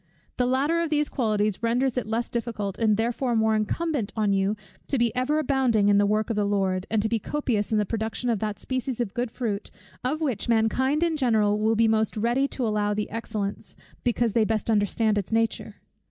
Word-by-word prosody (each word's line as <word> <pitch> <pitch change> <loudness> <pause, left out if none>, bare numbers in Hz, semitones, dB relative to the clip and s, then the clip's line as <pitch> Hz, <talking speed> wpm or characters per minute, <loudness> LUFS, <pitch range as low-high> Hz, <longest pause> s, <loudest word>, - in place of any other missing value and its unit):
The 250 - +2
latter 285 +6 +1
of 335 - -1
these 300 -1 +1
qualities 215 -5 0
renders 245 +2 +1
it 250 -4 -2
less 230 +2 -2
difficult, 225 -5 -3
and 215 -2 +3
therefore 240 +2 0
more 220 0 +3
incumbent 225 +1 -1
on 210 -3 +1
you, 195 +2 +1 0.3
to 275 - 0
be 235 -1 +1
ever 255 +5 +1
abounding 255 -8 +2
in 200 0 +5
the 205 - +3
work 215 +2 0
of - - -1
the 210 - +1
Lord; 195 -2 0
and 215 -1 +1
to - - +1
be 225 0 0
copious 230 -5 -2
in 215 - +2
the 210 - +2
production 220 +3 -3
of 220 - 0
that 210 0 -3
species 260 -1 -3
of 230 -5 -2
good 245 0 -2
fruit, 220 -4 -3 0.3
of 275 +5 -1
which 265 -8 -2
mankind 260 +7 +2
in 330 -2 +1
general 215 -6 +2
will 220 +1 +2
be 225 +1 +4
most 220 -1 +1
ready 240 +5 +1
to 260 -3 -3
allow 210 -1 0
the 210 0 -3
excellence, 210 -2 -4 0.3
because 235 -2 +1
they 230 - +3
best 220 +1 0
understand 210 0 +2
its 200 - -6
nature. 225 0 0
225 Hz, 210 wpm, -25 LUFS, 210-250 Hz, 0.3 s, in